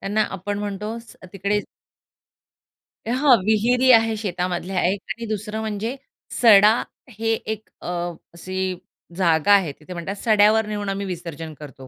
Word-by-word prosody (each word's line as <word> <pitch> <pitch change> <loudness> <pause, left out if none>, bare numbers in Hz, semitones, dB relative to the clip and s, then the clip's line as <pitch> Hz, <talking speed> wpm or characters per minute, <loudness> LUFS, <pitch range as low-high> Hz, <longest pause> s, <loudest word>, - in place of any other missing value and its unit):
त्यांना 210 +2 0
आपण 200 +2 -4
म्हणतो 210 +2 -4 0.4
तिकडे 200 +2 0 1.5
हां 255 +2 +5
.विहिरी 245 +4 +3
आहे 225 -1 +5
शेतामधल्या 180 -2 -2
एक 190 +2 +1
आणि 235 - -4
दुसरं 215 0 -4
म्हणजे 220 +3 -3 0.5
सडा 210 -2 +8 0.4
हे 225 0 -5
एक 220 -1 -5
अ, - - -8 0.5
अशी 185 +2 -3 0.4
जागा 170 0 +3
आहे. 185 -7 +3
तिथे 155 +5 -11
म्हणतात 175 +3 -5
सड्यावर 215 0 +4
नेऊन 205 -1 -3
आम्ही 195 0 -3
विसर्जन 165 -3 -6
करतो, 135 -3 -11
205 Hz, 130 wpm, -22 LUFS, 185-220 Hz, 1.5 s, सडा